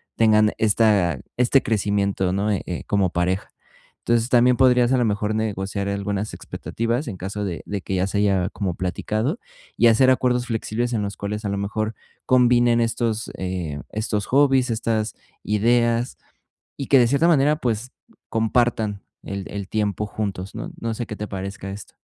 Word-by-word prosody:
tengan 110 Hz, -1 st, +4 dB
esta 105 Hz, -, +3 dB, 0.2 s
este 125 Hz, +2 st, +4 dB
crecimiento, 100 Hz, -3 st, 0 dB
¿no?, 100 Hz, +2 st, 0 dB
eh, 100 Hz, -, -1 dB
eh, 90 Hz, -, -4 dB
como 100 Hz, -4 st, +1 dB
pareja. 90 Hz, +2 st, -1 dB, 0.5 s
Entonces, 115 Hz, -1 st, +1 dB
también 125 Hz, 0 st, +4 dB
podrías, 125 Hz, -2 st, +4 dB
a -, -, +4 dB
lo 120 Hz, -, +2 dB
mejor, 105 Hz, 0 st, -1 dB
negociar 100 Hz, -2 st, -2 dB
algunas 100 Hz, +1 st, -2 dB
expectativas 115 Hz, +5 st, -3 dB
en 105 Hz, -, -4 dB
caso 100 Hz, +3 st, -4 dB
de 85 Hz, -3 st, -4 dB
de 100 Hz, -2 st, -4 dB
que 95 Hz, +4 st, -3 dB
ya 95 Hz, +1 st, +1 dB
se 100 Hz, -, -3 dB
haya 95 Hz, -2 st, +2 dB
como 95 Hz, -5 st, -3 dB
platicado 110 Hz, -, -2 dB, 0.4 s
y 120 Hz, -, +5 dB
hacer 130 Hz, +3 st, +5 dB
acuerdos 125 Hz, -1 st, +2 dB
flexibles 120 Hz, +1 st, -2 dB
en 105 Hz, -, 0 dB
los 100 Hz, 0 st, -4 dB
cuales, 105 Hz, +1 st, -4 dB
a -, -, -1 dB
lo 100 Hz, -, -2 dB
mejor, 110 Hz, +2 st, -2 dB, 0.3 s
combinen 120 Hz, -2 st, +4 dB
estos, 115 Hz, -1 st, -1 dB
eh, 90 Hz, -6 st, -4 dB
estos 105 Hz, -1 st, -2 dB
hobbies, 135 Hz, -3 st, +3 dB
estas 110 Hz, -1 st, -1 dB, 0.3 s
ideas 115 Hz, +3 st, +1 dB, 0.6 s
y 135 Hz, -, -4 dB
que 135 Hz, -, +6 dB
de 120 Hz, -, +5 dB
cierta 140 Hz, +6 st, +3 dB
manera, 150 Hz, -1 st, +4 dB
pues, 120 Hz, -3 st, -2 dB, 0.4 s
compartan 110 Hz, -2 st, +1 dB, 0.2 s
el 100 Hz, 0 st, -5 dB
el 100 Hz, -2 st, -6 dB
tiempo 105 Hz, -1 st, -1 dB
juntos, 100 Hz, -3 st, -4 dB
¿no? -, -, -5 dB
No 115 Hz, -1 st, -2 dB
sé, 120 Hz, +1 st, -4 dB
¿qué 105 Hz, -, -6 dB
te 105 Hz, 0 st, -5 dB
parezca 95 Hz, 0 st, -6 dB
esto? 100 Hz, +1 st, -10 dB
110 Hz, 170 wpm, -23 LUFS, 100-120 Hz, 0.6 s, que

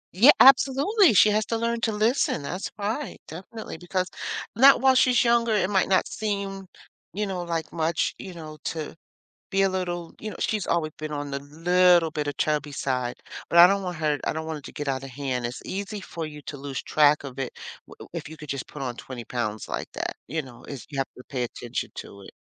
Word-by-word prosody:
Yeah, 235 Hz, +9 st, +7 dB
absolutely, 280 Hz, -, +6 dB
she 210 Hz, -, +7 dB
has 215 Hz, +1 st, +2 dB
to 230 Hz, -, 0 dB
learn 235 Hz, 0 st, -1 dB
to 230 Hz, -, +1 dB
listen, 215 Hz, -, +1 dB
that's 185 Hz, +7 st, -4 dB
right, 220 Hz, +7 st, -3 dB
definitely. 190 Hz, +4 st, -8 dB
Because 180 Hz, +1 st, -1 dB, 0.5 s
not 270 Hz, +5 st, +8 dB
while 265 Hz, 0 st, +5 dB
she's 255 Hz, -1 st, +4 dB
younger, 235 Hz, -1 st, +3 dB
it 205 Hz, -1 st, +1 dB
might 190 Hz, -2 st, +3 dB
not 190 Hz, -, +4 dB
seem, 200 Hz, -2 st, -3 dB, 0.5 s
you 210 Hz, +2 st, -1 dB
know, 190 Hz, -3 st, -3 dB
like 165 Hz, -2 st, -3 dB
much, 165 Hz, 0 st, 0 dB
you 185 Hz, -2 st, -8 dB
know, 155 Hz, -2 st, -9 dB
to 155 Hz, -2 st, -4 dB, 0.6 s
be 195 Hz, 0 st, +2 dB
a 195 Hz, -, +4 dB
little 175 Hz, -3 st, -3 dB
you 215 Hz, -, -6 dB
know, -, -, -8 dB
she's 215 Hz, -3 st, 0 dB
always 165 Hz, -2 st, 0 dB
been 155 Hz, 0 st, -5 dB
on 145 Hz, -1 st, -4 dB
the 140 Hz, -, -2 dB
little 170 Hz, +3 st, +3 dB
bit 150 Hz, -1 st, -3 dB
a 145 Hz, -, -1 dB
chubby 150 Hz, 0 st, -1 dB
side, 125 Hz, -3 st, -1 dB, 0.3 s
but 170 Hz, -, +6 dB
I 175 Hz, -, +11 dB
don't 195 Hz, 0 st, +1 dB
want 180 Hz, -3 st, -4 dB
her 150 Hz, -2 st, +1 dB
I -, -, +1 dB
don't 160 Hz, 0 st, -4 dB
want 160 Hz, -1 st, -3 dB
her -, -, -13 dB
to -, -, -10 dB
get 145 Hz, -1 st, -5 dB
out 135 Hz, 0 st, -1 dB
of 135 Hz, -, -8 dB
hand. 130 Hz, -2 st, -2 dB
It's 120 Hz, -, -7 dB
easy 200 Hz, +2 st, -4 dB
for 165 Hz, -3 st, -6 dB
you 150 Hz, -1 st, -9 dB
to 145 Hz, -, -7 dB
lose 140 Hz, -1 st, -5 dB
track 150 Hz, -1 st, +4 dB
of 135 Hz, -2 st, -9 dB
it 135 Hz, -2 st, -4 dB, 0.3 s
w -, -, -12 dB
if -, -, -5 dB
you 160 Hz, -, -10 dB
could 150 Hz, 0 st, -11 dB
just 140 Hz, -1 st, -4 dB
put 150 Hz, -, -8 dB
on 125 Hz, -2 st, -3 dB
20 125 Hz, -2 st, -8 dB
pounds 110 Hz, -4 st, -3 dB
like -, -, -3 dB
that, -, -, -4 dB
you 160 Hz, +5 st, -2 dB
know? 125 Hz, -3 st, -14 dB
It's 140 Hz, -4 st, -8 dB
you 140 Hz, -, -5 dB
have 135 Hz, -, +1 dB
to 125 Hz, -, -11 dB
pay 125 Hz, -3 st, -2 dB
attention 120 Hz, 0 st, -5 dB
to 100 Hz, 0 st, -9 dB
it. -, -, -11 dB
165 Hz, 230 wpm, -26 LUFS, 145-200 Hz, 0.6 s, I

